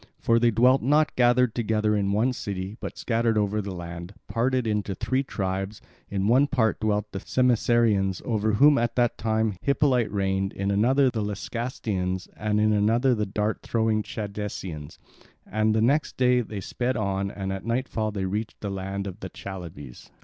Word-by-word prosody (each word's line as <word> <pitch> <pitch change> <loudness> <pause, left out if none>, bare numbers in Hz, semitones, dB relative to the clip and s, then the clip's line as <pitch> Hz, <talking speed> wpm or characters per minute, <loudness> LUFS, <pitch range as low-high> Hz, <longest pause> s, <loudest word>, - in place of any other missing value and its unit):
For 115 0 +2
they 120 0 +4
dwelt 125 +4 +4
not 150 +5 +2
gathered 120 -1 +3
together 110 -2 +1
in 100 -1 0
one 115 +6 +2
city, 100 -3 -5
but - - -6
scattered 115 -1 0
over 105 0 +1
the 100 - -6
land, 85 +2 -7
parted 125 +1 0
into 105 -3 -1
three 130 +8 0
tribes. 95 -4 -3 0.3
In 100 0 -1
one 130 +5 +4
part 120 -6 +1
dwelt 105 -1 -1
the 95 - -4
Themiscyreians, 115 -5 +2
over 110 -2 0
whom 140 +5 +6
at 120 0 -1
that 120 -2 +2
time 110 -3 0
Hippolyte 135 -5 +2
reigned, 95 -1 -1
in 100 +1 -2
another 130 +6 +3
the 110 - -2
Lycastians, 105 -3 -3
and 105 0 0
in 110 0 +3
another 115 +5 +3
the 105 -3 -1
dart 105 +2 -1
throwing 110 -1 +1
Chadesians. 100 -8 -6 0.5
And 110 0 +1
the 110 - +2
next 145 +6 +1
day 125 -1 +4
they 105 -3 -6
sped 125 +7 -2
on 100 -1 -1
and 95 -1 -4
at 95 - -5
nightfall 115 -2 -1
they 100 -2 -3
reached 105 +4 -3
the 100 - -3
land 95 +1 -4
of 95 0 -7
the - - -6
Chalybes. 80 -9 -9
110 Hz, 175 wpm, -26 LUFS, 100-120 Hz, 0.5 s, whom